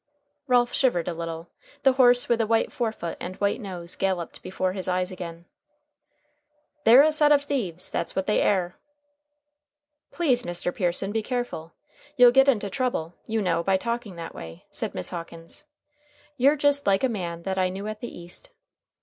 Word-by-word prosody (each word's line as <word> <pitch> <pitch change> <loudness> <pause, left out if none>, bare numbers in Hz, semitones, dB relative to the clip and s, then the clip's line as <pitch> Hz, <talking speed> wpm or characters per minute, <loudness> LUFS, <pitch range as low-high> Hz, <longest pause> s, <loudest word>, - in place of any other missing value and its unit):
Ralph 245 -1 +3
shivered 240 - +1
a 175 - -1
little. 165 0 -6 0.3
The 270 - +6
horse 245 -1 +5
with 235 -1 +2
the 225 - +1
white 225 0 +1
forefoot 220 -8 -3
and 185 +1 -6
white 200 +5 -1
nose 180 -4 -6
galloped 185 -3 -2
before 185 0 -2
his 190 -1 -4
eyes 180 0 0
again. 170 -2 -8 1.4
"They're 245 +5 +9
a 310 - +4
set 300 -1 +4
of 285 -1 +5
thieves. 200 - -3
That's - - -3
what 190 - -1
they 210 - +2
air." 180 -3 0 1.3
"Please, 270 -8 +1
Mr. 175 -2 -3
Pearson, 185 +1 -1
be 220 +1 0
careful. 240 -9 -4 0.4
You'll 245 -1 +8
get 270 +2 +5
into 210 -6 +1
trouble, 195 -7 -2
you 220 -1 -1
know, 170 -2 +1
by 190 +2 +2
talking 235 -2 -4
that 170 -1 -7
way," 80 0 -10
said - - -4
Miss 90 - -2
Hawkins. 165 -1 -8 0.7
"You're 280 +2 +4
just 285 -2 +2
like 195 +2 +3
a - - +5
man 170 -7 -4
that 190 0 -2
I 185 0 +2
knew 195 +2 -6
at 215 0 -5
the 240 - -6
East." 175 - -10
195 Hz, 175 wpm, -25 LUFS, 175-245 Hz, 1.4 s, They're